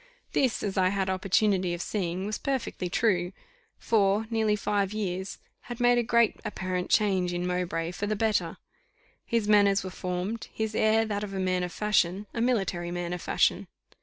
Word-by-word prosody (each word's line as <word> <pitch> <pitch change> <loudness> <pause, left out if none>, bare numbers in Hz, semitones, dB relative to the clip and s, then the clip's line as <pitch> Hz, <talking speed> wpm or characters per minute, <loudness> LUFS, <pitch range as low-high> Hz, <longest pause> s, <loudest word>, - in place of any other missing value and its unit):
This, 260 -4 +1
as 195 -1 -1
I 185 - +4
had 190 -1 0
opportunity 190 -1 +1
of 175 - -6
seeing, 185 -2 -2
was 210 0 -3
perfectly 255 -9 -2
true; 180 -3 +1 0.4
four, 205 -1 +2
nearly 220 -2 +2
five 205 -1 -1
years 190 -2 -3 0.3
had 240 - -6
made 245 0 +4
a - - +3
great 235 -1 +2
apparent 185 -3 -3
change 190 -4 +2
in 175 0 -2
Mowbray 175 -2 -2
for 200 +3 -4
the 215 - 0
better; 215 0 0 0.7
his 230 -3 0
manners 200 -2 +4
were 185 - -6
formed; 185 +5 -4
his 220 -1 -3
air 220 +1 +3
that 205 -1 -3
of 195 -1 -5
a - - -2
man 185 -1 0
of 180 -1 -3
fashion 200 -1 +1
a 230 - -2
military 195 -8 0
man 175 0 -3
of 180 - -5
fashion. - - +1
195 Hz, 180 wpm, -28 LUFS, 180-215 Hz, 0.7 s, I